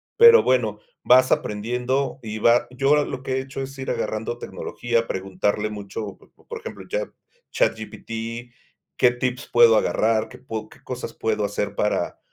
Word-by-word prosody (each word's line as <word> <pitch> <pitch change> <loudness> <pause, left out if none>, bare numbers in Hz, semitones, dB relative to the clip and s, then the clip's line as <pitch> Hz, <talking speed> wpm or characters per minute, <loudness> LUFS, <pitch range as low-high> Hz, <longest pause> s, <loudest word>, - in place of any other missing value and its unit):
pero 470 +1 +9
bueno, - - +1 0.2
vas 130 +1 +5
aprendiendo 125 +6 -1
y 110 -1 -5
va 120 +2 +4
yo 140 +3 +3
lo 130 -1 -6
que 130 - -2
he 130 - 0
hecho 135 +1 -7
es 135 +1 -7
ir 130 - -5
agarrando 110 +2 -3
tecnología, 120 -1 -2
preguntarle 95 +3 -1
mucho, 100 -1 -6
por 465 -1 -11
ejemplo, 465 - -9
Chat - - -2 0.4
ChatGPT. 115 - -3 0.4
¿Qué 125 - +5
tips 125 0 -3
puedo 120 -1 +7
agarrar? 110 0 +1
¿Qué - - -12
pue 110 -4 -6
qué - - -17
cosas - - -6
puedo - - -1
hacer - - -2
para - - -1
120 Hz, 155 wpm, -23 LUFS, 110-135 Hz, 0.4 s, pero